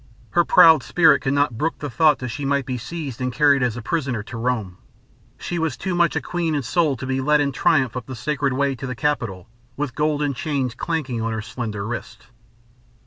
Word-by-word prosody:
Her - - +4
proud 160 - +7
spirit 170 +4 +4
could 135 -1 -1
not 140 -5 +1
brook 160 +2 -1
the 145 - -5
thought 150 +4 +3
that 125 - -5
she 140 +5 -5
might 140 -1 0
be 125 -1 -3
seized 140 -3 -6
and 125 0 -1
carried 140 +1 +3
as 125 -2 0
a 120 - -6
prisoner 130 -7 -2
to 115 - -9
Rome. 115 -6 -2 0.6
She 175 - -4
was 160 -5 -1
too 190 - -3
much 175 -1 +2
a - - 0
queen 170 -3 -2
in 145 - -1
soul 155 +2 +1
to 130 - -6
be 130 0 -1
led 150 +2 +3
in 145 -1 +1
triumph 130 -4 +2
up 125 -2 -5
the 130 - -6
Sacred 140 +2 -1
Way 140 +1 +1
to 135 - -6
the 125 - -4
Capitol 115 - -2 0.3
with 145 -3 -3
golden 150 -1 0
chains 130 -1 -2
clanking 130 -4 -3
on 115 0 -2
her 110 - -3
slender 110 -3 -5
wrists. 120 +2 -6
135 Hz, 220 wpm, -22 LUFS, 120-150 Hz, 0.6 s, proud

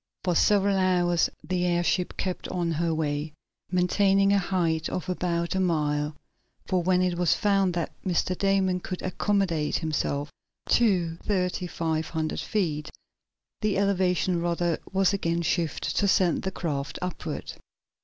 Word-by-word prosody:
For 180 - +1
several 200 +2 +3
hours 180 -2 +2
the 180 +3 -1
airship 175 +1 0
kept 185 -1 -3
on 175 -2 -1
her 165 +1 0
way, 150 -1 -2 0.4
maintaining 195 +2 +3
a 200 - +4
height 170 -4 0
of 185 - -4
about 170 -2 -1
a 190 - 0
mile, 150 -4 0 0.5
for 185 -2 +1
when 180 +1 +2
it 180 -1 0
was 175 -2 +3
found 195 -3 +2
that 170 -2 -2
Mr. 185 0 0
Damon 190 -1 +1
could 180 0 -6
accommodate 185 -4 0
himself 145 -2 -2 0.4
to 180 -8 +2
thirty 180 -2 -1
five 160 -2 -2
hundred 160 -1 -2
feet 160 -8 -1 0.7
the 215 -3 +1
elevation 185 -3 +1
rudder 170 -1 0
was 195 0 +2
again 170 -3 0
shifted 165 -1 -1
to 200 - +3
send 185 -3 +3
the 190 - -3
craft 145 -6 -3
upward. 180 -1 -5
180 Hz, 145 wpm, -26 LUFS, 165-190 Hz, 0.7 s, a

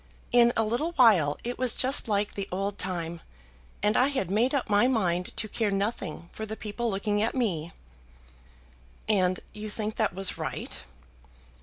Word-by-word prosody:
In 240 -1 +6
a 225 - +3
little 245 +10 -1
while 200 - +5
it 245 +1 -4
was 255 -2 +2
just 265 -1 +3
like 205 -1 0
the 200 -1 -4
old 195 +2 -2
time, 170 -2 -3 0.6
and 210 +1 +3
I 255 - +4
had 260 -11 -2
made 230 +6 +3
up 275 - 0
my 210 +3 +4
mind 180 -8 0
to 215 - +1
care 215 0 -1
nothing 195 -4 -2
for 220 - -6
the 220 0 -4
people 225 +2 -3
looking 205 +1 0
at 225 +4 0
me." 175 -10 -1 1.4
"And 185 -4 +2
you 215 0 -6
think 215 0 -4
that - - 0
was 195 0 0
right?" - - -4
210 Hz, 170 wpm, -28 LUFS, 190-235 Hz, 1.4 s, In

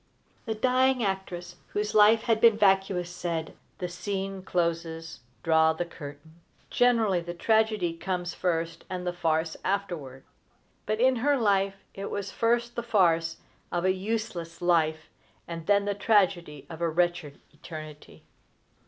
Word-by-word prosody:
The 220 -2 -2
dying 255 +2 +2
actress 180 -3 -4 0.2
whose 210 0 -1
life 215 +2 +6
had 225 -2 +1
been 230 -2 +6
vicious 195 -3 +2
said: 170 -2 -4 0.2
"The 180 - -3
scene 190 +2 -4
closes. 165 -3 -2 0.2
Draw 160 -1 +4
the 175 +2 -3
curtain." 155 0 -11 0.3
Generally 225 -7 +3
the 175 +1 -6
tragedy 215 -3 +2
comes 180 +1 -3
first, 165 -2 -2
and 180 -1 -4
the 180 - -1
farce 160 -1 0
afterward; 170 -10 -3 0.6
but 215 +1 0
in 255 +1 +4
her 285 +4 +2
life 200 -4 +2 0.2
it 195 0 -5
was 200 -1 -4
first 235 +1 0
the 235 - -1
farce 170 -8 +2 0.3
of 175 +1 -1
a 185 - +4
useless 185 -4 -4
life, 160 -3 +1 0.4
and 165 -1 -7
then 200 0 +4
the 205 - 0
tragedy 190 -8 +1
of 165 0 -9
a 170 - +2
wretched 175 -3 -1
eternity. 155 -1 -10
180 Hz, 145 wpm, -27 LUFS, 165-210 Hz, 0.6 s, life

